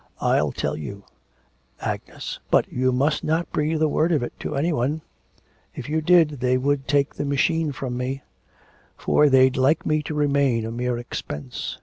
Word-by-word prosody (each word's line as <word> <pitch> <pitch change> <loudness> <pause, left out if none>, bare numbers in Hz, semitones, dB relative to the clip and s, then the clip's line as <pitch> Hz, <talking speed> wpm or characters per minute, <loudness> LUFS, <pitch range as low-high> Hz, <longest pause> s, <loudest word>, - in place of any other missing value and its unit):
I'll 75 -1 +2
tell - - -2
you, 100 +7 -7 0.8
Agnes, - - -5
but - - +3
you 130 +1 +2
must 140 +4 +1
not 160 +2 0
breathe 155 +1 0
a - - +4
word 160 +3 +1
of 150 -6 +2
it 120 - -5
to 150 - -4
any 160 +5 +1
one, 150 +4 -1 0.7
if - - -6
you 155 +2 0
did, 155 -4 +4
they 125 0 +2
would 140 +1 0
take 140 0 +2
the - - -4
machine 150 +3 +1
from 130 -3 -4
me: 130 +2 -3 0.7
for 150 -1 +3
they'd 130 -1 +5
like 135 +5 +2
me 155 0 +1
to 150 +1 -5
remain 140 -6 +2
a 115 - -4
mere 120 +1 -2
expense. 75 - -6
140 Hz, 180 wpm, -23 LUFS, 125-150 Hz, 0.8 s, they'd